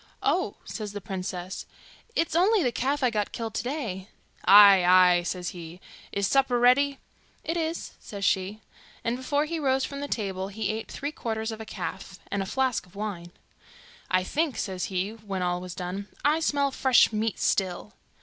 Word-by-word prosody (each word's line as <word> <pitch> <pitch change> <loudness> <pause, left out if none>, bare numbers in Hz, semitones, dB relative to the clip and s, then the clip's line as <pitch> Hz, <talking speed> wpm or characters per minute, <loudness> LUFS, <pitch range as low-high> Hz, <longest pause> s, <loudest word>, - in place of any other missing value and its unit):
'Oh,' - - +1
says 210 -2 -6
the 205 - -4
princess, 185 -1 -5 0.5
'it's 330 -1 0
only 385 +3 +4
the 245 - +1
calf 275 +4 -1
I 250 - +3
got 210 -2 -1
killed 225 -2 -5
to - - -1
day.' 230 -8 -4 0.4
'Ay, 200 -2 +9
ay,' 180 0 +6
says 180 0 -3
he, 170 0 -9 0.3
'is 200 0 0
supper 265 +1 +3
ready?' 275 +3 +4 0.5
'It 330 - -2
is,' 330 0 -2
says 200 -3 -5
she; 195 +4 0 0.4
and 230 +1 0
before 285 +4 0
he 330 +1 -3
rose 265 -2 +1
from 280 0 -6
the 285 - -3
table 195 -6 -2
he 205 +1 -2
ate 220 +1 -5
three 285 +1 -4
quarters 220 -5 -3
of 220 0 -7
a - - -7
calf, - - -6
and 200 - 0
a 195 - -3
flask 260 -5 0
of 180 - -22
wine. 195 -5 -5 0.8
'I 185 0 +2
think,' 290 - -1
says 190 -4 -2
he, 190 +2 -2
when 205 -4 -5
all 180 0 -1
was 180 -1 -7
done, 185 +3 -5 0.2
'I 300 +2 +4
smell 285 -3 +1
fresh 260 -3 +4
meat 215 0 -1
still. 190 +2 -1
215 Hz, 185 wpm, -27 LUFS, 190-265 Hz, 0.8 s, Ay